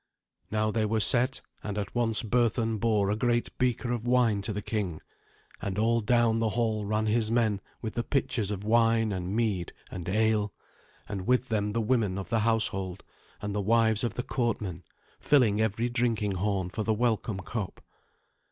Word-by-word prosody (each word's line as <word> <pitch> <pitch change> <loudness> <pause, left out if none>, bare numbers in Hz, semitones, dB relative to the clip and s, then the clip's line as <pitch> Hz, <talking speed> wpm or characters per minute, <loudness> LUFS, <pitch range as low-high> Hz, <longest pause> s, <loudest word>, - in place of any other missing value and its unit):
Now 110 0 0
they 110 0 0
were 110 +1 +1
set, 125 +4 +4 0.2
and 105 -1 -4
at 100 -1 -4
once 115 -1 +1
Berthun 115 -1 +1
bore 105 -3 +2
a - - +1
great 120 +1 0
beaker 125 -1 0
of 120 -1 -3
wine 120 -5 +3
to 100 - -2
the 105 0 -4
king, 100 -8 -2 0.6
and 100 0 -3
all 115 +2 +2
down 115 0 +3
the 115 -1 +1
hall 110 -3 0
ran 110 +1 0
his 110 0 +2
men 110 -4 +1 0.2
with 110 - -3
the 120 - -1
pitchers 120 -7 0
of 100 -1 -4
wine 115 0 +3
and 95 +1 -3
mead 105 -7 -1 0.2
and 90 0 -5
ale, 105 0 +1 0.5
and 95 -3 -5
with 125 0 +2
them 105 -2 0
the 115 - 0
women 110 -4 +1
of 95 -3 -5
the 115 - +2
household 100 -4 0 0.4
and 105 -1 -2
the 105 - -1
wives 110 +1 +3
of 115 -3 -1
the 125 - -2
courtmen, 110 -10 -2 0.4
filling 115 -8 +3
every 110 +2 0
drinking 115 -4 0
horn 95 -1 -1
for 110 - -3
the 110 0 +1
welcome 110 -3 0
cup. 105 0 -5
110 Hz, 180 wpm, -28 LUFS, 105-115 Hz, 0.6 s, set